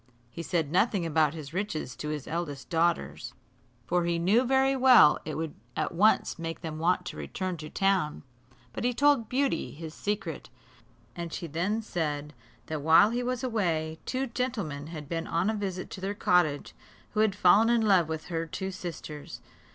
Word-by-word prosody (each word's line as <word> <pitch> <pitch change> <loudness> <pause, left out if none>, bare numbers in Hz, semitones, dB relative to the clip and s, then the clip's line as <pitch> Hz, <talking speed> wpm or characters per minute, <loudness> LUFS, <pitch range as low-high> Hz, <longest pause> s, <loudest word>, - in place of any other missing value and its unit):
He 170 - -6
said 165 -4 -1
nothing 185 0 +2
about 155 -1 +2
his 150 -2 -8
riches 170 - -3
to 150 - -4
his 150 -2 -4
eldest 155 -3 -4
daughters, 170 0 0 0.5
for 175 +4 +1
he 170 0 +1
knew 195 +9 +3
very 265 +1 +3
well 255 - +7
it 155 - -4
would 160 -1 -3 0.2
at 155 - -1
once 195 0 +2
make 165 0 -5
them 160 -2 -5
want 180 +2 +1
to - - -6
return 185 -1 -4
to 155 -1 -8
town; 195 -6 0 0.5
but - - -4
he 245 0 +1
told 280 -5 +3
Beauty 270 +1 0
his 160 +1 -8
secret, 210 +4 -4 0.7
and 170 -1 -5
she 175 - -5
then 180 +8 -1
said, 150 -6 -3 0.3
that 155 -2 -4
while 165 +8 +6
he 240 +1 -1
was 250 0 -2
away, 165 -10 -1
two 260 +1 -1
gentlemen 225 - -3
had 155 -3 -8
been 165 +1 -3
on 175 +6 +1
a - - -3
visit 195 -3 -4
to 185 - -7
their 195 +2 -3
cottage, 175 -7 +1 0.4
who 215 - -2
had 215 -2 +3
fallen 205 +4 +5
in 235 -1 +3
love 190 -7 +4
with 160 -1 -4
her 165 -1 -3
two 190 +4 -4
sisters. 165 -5 -7
175 Hz, 180 wpm, -28 LUFS, 160-215 Hz, 0.7 s, well